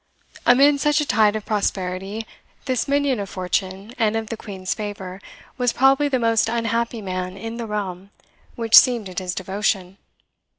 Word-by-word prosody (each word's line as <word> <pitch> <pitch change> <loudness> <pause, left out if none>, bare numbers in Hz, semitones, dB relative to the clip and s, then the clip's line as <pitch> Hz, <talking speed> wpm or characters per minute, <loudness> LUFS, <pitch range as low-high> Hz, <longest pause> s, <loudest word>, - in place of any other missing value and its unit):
Amid 280 +4 +6
such 295 0 +3
a 300 - 0
tide 215 -5 +3
of 215 - -4
prosperity, 195 0 -2 0.4
this 255 -4 -1
minion 280 -3 +1
of 200 -2 -5
fortune 190 +3 -3
and 220 -1 +2
of 225 0 -3
the - - -2
Queen's 190 -4 -5
favour 200 -3 -6 0.4
was 245 -2 +1
probably 270 +3 +4
the 270 -2 +1
most 230 -2 +2
unhappy 230 0 -1
man 185 0 -4
in 225 +3 -6
the 235 -1 -5
realm 195 -3 -4 0.5
which 225 -1 -5
seemed 235 -6 +6
at 180 - -4
his 185 0 -4
devotion. 190 0 -2
215 Hz, 165 wpm, -22 LUFS, 190-235 Hz, 0.5 s, Amid